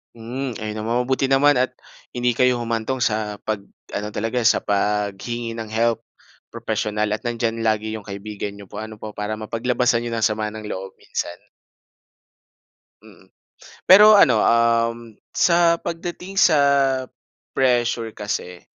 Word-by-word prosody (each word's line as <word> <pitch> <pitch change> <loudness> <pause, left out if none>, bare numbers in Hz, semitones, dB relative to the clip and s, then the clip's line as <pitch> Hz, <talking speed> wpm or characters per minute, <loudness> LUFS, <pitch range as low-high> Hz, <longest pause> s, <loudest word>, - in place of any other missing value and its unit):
Hmm, 125 +3 -5
ayun 110 0 -4
naman. 110 +2 -2
Mabuti 130 +2 0
naman 135 +1 +4
at 130 +1 +1 0.4
hindi 120 -1 0
kayo 125 -1 +3
humantong 115 +2 -2
sa 105 -2 -1
pag-ano 105 0 -6
talaga, 115 +4 -2
sa 115 - +4
paghingi 105 +3 -2
ng 115 - -4
help, 115 0 +1 0.5
propesyonal. 105 0 -2
At 105 +4 -3
nandiyan 115 -1 -2
lagi 110 0 0
'yong 105 - -12
kaibigan 100 0 -6
n'yo 100 -2 -13
po, - - -9
ano 110 0 -8
po, 110 - -6
para 105 0 -4
mapaglabasan 115 +2 0
n'yo 120 - -4
ng 115 - -2
sama 110 0 0
ng 110 -1 -7
loob 95 -1 -6
minsan. 85 - -4 1.7
Mm. - - -19 0.6
Pero 210 +3 +9
ano, - - +5
um, 115 -1 +1 0.2
sa 170 -1 +3
pagdating 175 +3 -6
sa 160 -5 +5 1.0
pressure 120 -3 +1
kasi, 90 -4 -5
115 Hz, 140 wpm, -22 LUFS, 105-125 Hz, 1.7 s, Pero